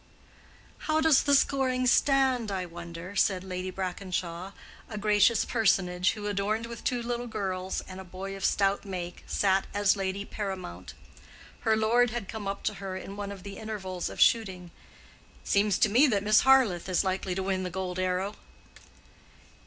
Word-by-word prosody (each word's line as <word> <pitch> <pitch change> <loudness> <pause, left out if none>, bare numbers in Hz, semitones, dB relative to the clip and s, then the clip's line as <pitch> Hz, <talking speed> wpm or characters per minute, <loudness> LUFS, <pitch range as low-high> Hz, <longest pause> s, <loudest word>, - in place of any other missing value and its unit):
"How 310 0 +2
does 315 -3 +5
the 285 -1 +3
scoring 260 -2 +2
stand, 260 -3 +3
I 185 -2 -2
wonder?" 170 +2 -9
said 190 -1 +2
Lady 185 0 -4
Brackenshaw, 185 -1 -4 0.4
a 215 - -6
gracious 210 +1 +3
personage 185 -5 +2
who, 210 -2 -7
adorned 205 +2 -1
with 235 -1 -8
two 245 -2 -1
little 240 0 -3
girls 190 -4 -3
and 185 0 -10
a - - -7
boy 190 +2 -7
of 195 - -8
stout 200 0 +2
make, 180 -3 -6
sat 195 -1 +1
as 205 0 +3
lady 195 0 -3
paramount. 190 - -6 0.6
Her 220 -1 +2
lord 235 +3 +3
had 225 -3 -4
come 215 -1 -6
up 195 0 -4
to - - 0
her 190 -1 -4
in 195 +1 -8
one 200 0 -5
of 195 -2 -9
the 200 -1 -8
intervals 190 -5 -4
of - - -9
shooting. 185 -6 +2 0.7
"It - - -15
seems 200 -1 +3
to - - +4
me 245 +8 +5
that 205 -6 +1
Miss 215 +1 +5
Harleth 240 -10 +4
is 185 - +2
likely 190 -1 -2
to 190 - -2
win 190 -1 -1
the 185 - -3
gold 185 0 -4
arrow." 185 +2 -1
195 Hz, 175 wpm, -28 LUFS, 185-220 Hz, 0.7 s, does